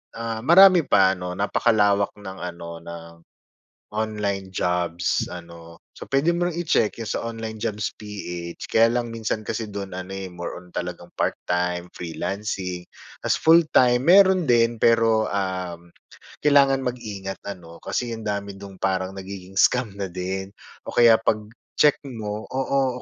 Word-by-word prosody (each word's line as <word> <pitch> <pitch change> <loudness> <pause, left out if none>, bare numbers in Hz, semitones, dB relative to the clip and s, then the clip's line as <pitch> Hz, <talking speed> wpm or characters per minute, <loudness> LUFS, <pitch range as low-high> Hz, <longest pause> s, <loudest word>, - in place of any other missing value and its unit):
ah, 115 -1 -4
marami 175 +4 +7
pa, 95 -2 +5
'no. 90 -1 -4
Napakalawak 100 -1 +2
ng 95 -2 -9
ano, 85 -1 -7
ng 85 0 -9 0.9
online 105 -3 -2
jobs, 90 -2 -1
ano. 85 -1 -11 0.2
So - - -11
puwede 145 +5 +2
mo 175 +1 0
ring 170 - -6
i-check 155 -10 +1
'yong 115 - -5
sa - - -2
onlinejobs.ph. 105 -5 -5
Kaya 115 +1 +4
lang, 120 -1 -2
minsan 110 -1 -3
kasi 110 -1 -3
do'n 100 -2 -6
ano, 95 +1 -6
eh, 95 0 -5
more 90 -1 -6
on 90 0 -17
talagang 90 -1 -5
part-time, 90 0 -1
freelancing. 90 +1 -4 0.4
Tapos - - +1
full-time, 150 -7 +5
mayroon 185 +3 +6
din, 120 -4 +3
pero, 115 -1 +4
um, 90 -3 -3 0.6
kailangan 135 -2 +4
mag-ingat 105 -6 -5
ano, 85 -4 -10
kasi 120 -2 -2
ang 110 - -6
dami 100 -1 -3
do'n 100 -1 -11
parang 95 0 -1
nagiging 95 0 -8
scam 125 +6 +3
na 100 - -2
din. 95 +2 -5 0.3
O - - -6
kaya 115 -2 +7
pag-check 110 +6 0
mo 110 -5 -5
oo, 130 -1 -1
100 Hz, 140 wpm, -24 LUFS, 90-115 Hz, 0.9 s, marami